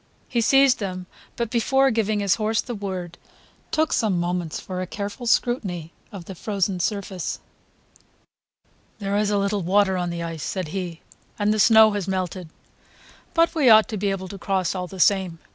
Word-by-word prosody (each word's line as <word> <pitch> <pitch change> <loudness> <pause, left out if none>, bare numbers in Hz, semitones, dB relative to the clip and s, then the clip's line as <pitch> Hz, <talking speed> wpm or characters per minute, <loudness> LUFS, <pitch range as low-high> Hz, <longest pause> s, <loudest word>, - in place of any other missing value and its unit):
He 235 - 0
seized 270 +2 +4
them, 185 -3 -4 0.3
but 235 -2 -3
before 265 +3 +3
giving 215 -2 0
his 200 -1 +3
horse 220 +1 +1
the 245 - -3
word, 185 -5 -5 0.5
took 315 0 +1
some 205 -6 +1
moments 175 -2 -2
for 185 -1 -5
a 185 - -4
careful 205 +6 -5
scrutiny 190 -10 0 0.2
of 190 -4 -9
the 190 - -7
frozen 195 0 -2
surface. 190 -2 -3 1.6
"There 200 -1 -2
is 210 0 +1
a 205 - +1
little 200 0 0
water 190 +1 +2
on 175 -1 -2
the 170 0 -4
ice," 165 -2 -5
said 185 -1 -3
he, 175 -2 -5 0.4
"and 210 0 +2
the 215 - -1
snow 220 0 +7
has 205 -2 -3
melted; 185 -2 -3 0.9
but 335 0 +3
we 295 -7 +4
ought 220 -1 +7
to 220 - -3
be 200 +1 0
able 190 -1 -3
to 195 - -8
cross 190 -2 0
all 180 -1 -4
the 190 +1 -10
same. 185 -3 +2
200 Hz, 180 wpm, -23 LUFS, 180-220 Hz, 1.6 s, snow